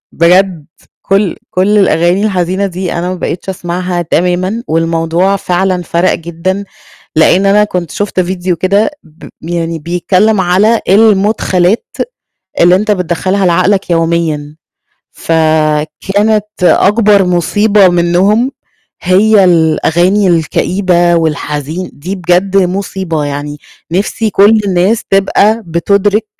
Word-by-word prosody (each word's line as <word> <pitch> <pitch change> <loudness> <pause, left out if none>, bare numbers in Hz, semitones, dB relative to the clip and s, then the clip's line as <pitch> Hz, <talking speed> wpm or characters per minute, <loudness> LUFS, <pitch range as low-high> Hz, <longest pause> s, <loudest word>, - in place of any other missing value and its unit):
بجد 175 -2 +2 0.4
كل 195 -1 0
كل 200 +3 +1
الأغاني 185 +1 +2
الحزينة 190 0 -1
دي 185 -1 -4
أنا 175 +1 -3
ما 185 - -3
بقيتش 180 +1 -5
أسمعها 180 -1 -3
تمامًا 180 +7 -1
والموضوع 165 +4 0
فعلًا 185 -1 -1
فَرَق 170 +2 0
جدًا، 170 +4 -4 0.5
لإن 180 +5 +3
أنا 210 +1 +4
كنت 180 -6 -4
شُفت 205 -2 -2
فيديو 180 -1 -2
كده 200 - +1
ب 160 0 -15
يعني 165 0 -3
بيتكلّم 185 +6 0
على 200 +6 +2
المُدخَلات 200 -1 +2 0.7
اللي 175 +1 +5
أنت 210 +2 0
بتدخّلها 185 +1 -1
لعقلك 185 +3 +1
يوميًا، 165 -3 -1 0.6
فكانت 160 +7 0 0.2
أكبر 205 +2 +3
مُصيبة 195 +3 +2
منهم 185 +8 +1 0.5
هي 195 +2 +3
الأغاني 175 +3 +2
الكئيبة 175 +1 +1
والحزين 155 +1 -3
دي 180 +7 -6
بجد 180 +2 0
مُصيبة 185 -4 -1
يعني 145 +1 -5 0.3
نِفْسي 210 +3 -1
كل 210 +3 +4
الناس 190 +4 0
تبقى 200 +3 +2
بتُدرِك 200 +5 0
180 Hz, 110 wpm, -11 LUFS, 170-200 Hz, 0.7 s, اللي